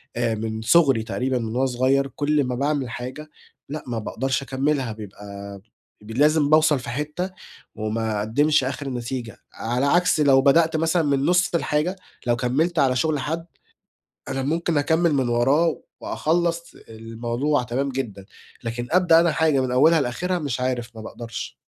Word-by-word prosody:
آآ 115 -2 0
من 110 0 -4
صُغري 135 -3 +4
تقريبًا 130 +2 -1
من 110 0 -4
وأنا 135 +1 +2
صُغيَّر، 130 +2 +1
كُلّ 145 +2 0
ما 125 -1 -2
باعمِل 140 -2 -1
حاجة، 130 +6 -7 0.4
لأ 150 +2 -5
ما 115 -2 -2
باقدَرش 130 +6 -2
أكمِّلها، 135 -1 -1
بيبقى 100 -1 -9 0.4
ب 105 +2 -11
لازِم 150 +3 +3
باوصَل 155 -2 +4
في 120 - -7
حِتَّة، 150 +8 -3 0.4
وما 110 0 -2
أقدّمِش 140 +8 +2
آخِر 135 +1 -3
نتيجَة، 120 -1 -5 0.2
على 120 +4 -1
عَكس 175 +2 +3
لو 135 -3 +5
بَدأت 160 +4 +4
مثلًا 165 +1 +1
من 140 -1 +1
نُصّ 180 +1 +2
الحاجة، 160 +3 0 0.3
لو 120 - +3
كمّلت 145 +8 0
على 130 -2 +3
شُغل 150 +3 +1
حَدّ، 160 +5 -3 0.8
أنا 135 - -2
مُمكِن 165 +2 0
أكمّل 160 +3 +2
مِن 130 -3 +1
وراه 135 +8 +2 0.2
وأخلّص 170 +1 -1
الموضوع 115 +5 -2
تمام 125 +3 -2
جدًا، 120 -8 -5 0.4
لكن 120 +1 -4
أبدأ 170 -2 +5
أنا 170 -2 +2
حاجة 155 -4 +2
مِن 130 -1 -1
أوّلها 155 +6 +5
لآخِرها، 175 +8 -1
مش 140 -6 -3
عارف، 125 -2 -2
ما - - -7
باقدرَش. 115 +1 -7
135 Hz, 160 wpm, -23 LUFS, 120-155 Hz, 0.8 s, لو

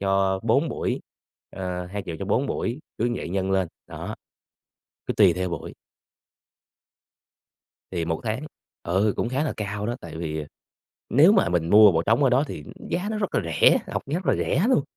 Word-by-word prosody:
cho 95 -1 +1
4 - - +2
buổi. - - -2 0.5
Ờ, 90 -1 -4
2.000.000 90 -4 -5
cho 100 - -4
4 125 +7 +1
buổi 120 +1 -2 0.2
cứ 120 +2 +1
vậy - - -5
nhân 95 +1 -1
lên, 95 -3 +1 0.2
đó. - - -6 0.9
Cứ - - -2
tùy - - +6
theo 90 0 -2
buổi. - - -6 2.2
Thì 85 -2 -1
1 80 -1 -2
tháng 110 +6 -2 0.4
ừ, 95 +4 +1
cũng 120 - 0
khá 135 +4 0
là - - -1
cao 105 0 -3
đó, 120 - -1
tại - - -9
vì, 80 -2 -3
ờ, 75 - -7 0.6
nếu 150 - +7
mà 195 - +3
mình 85 -2 0
mua 105 -2 +8
bộ 80 0 +1
trống 115 +8 +3
ở 130 - +4
đó 130 +4 +3
thì 75 - -7 0.3
giá 185 +4 -1
nó 215 - -2
rất 200 - -2
là - - +3
rẻ, 80 -2 +4
học - - -3
rất 170 +2 -2
là 135 - +4
rẻ 170 - +1
luôn. 255 - +4
100 Hz, 190 wpm, -25 LUFS, 90-130 Hz, 2.2 s, mua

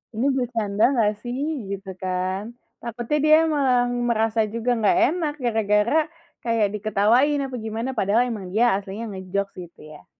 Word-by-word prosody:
Ini 230 +4 0
bercanda 225 -5 -1
gak 210 -2 +3
sih 245 +1 -5 0.3
gitu 195 -1 -5
kan, 185 +4 -3 0.3
takutnya 240 +5 -2
dia 310 0 +7
malah 270 -6 +2 0.3
merasa 225 -1 +1
juga 230 +2 0
gak 225 +11 +3
enak 325 -4 -2
gara-gara 220 +2 +2 0.4
kayak 230 -3 +1
diketawain 225 +8 +2
apa 260 -1 -6
gimana 225 +3 -3
padahal 210 +4 +3
emang 205 -6 -5
dia 235 +3 +4
aslinya 200 +3 -6
nge-jokes 195 +1 -3 0.2
gitu - - -20
ya. 150 - -15
225 Hz, 145 wpm, -23 LUFS, 200-245 Hz, 0.4 s, dia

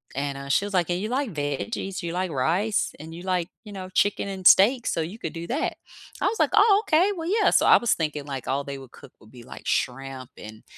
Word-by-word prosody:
and, 140 0 -2
uh, 140 0 -8
she 195 - +2
was 205 - -6
like, 180 -3 +2
"Hey, 175 - -1
you 210 +4 -3
like 255 -3 -1
veggies? 150 - -3
You 170 -1 -3
like 185 0 -2
rice? 175 +10 0
And 160 +2 -9
you 175 - -9
like, 180 -2 -1 0.2
you 210 - -10
know, 185 -1 -7
chicken 200 +2 +1
and 190 -2 +1
steak. 235 +6 +6
So 165 - 0
you 180 +8 -6
could 165 - -5
do 165 0 -6
that." 275 +6 -2 0.4
I - - +1
was 450 - -2
like, - - +3
"Oh, 410 -1 +6
okay. 350 +5 +3
Well, 330 -2 -5
yeah." 425 +3 +3
So - - +4
I - - +8
was 240 - +2
thinking, 150 -3 -3
like, 135 -3 -6
all 140 +2 0
they 140 0 -6
would 130 -2 -13
cook - - -15
would 110 - -19
be, 125 -2 -13
like, - - -12
shrimp 130 0 -2
and, 110 +1 -11
175 Hz, 255 wpm, -25 LUFS, 140-210 Hz, 0.4 s, I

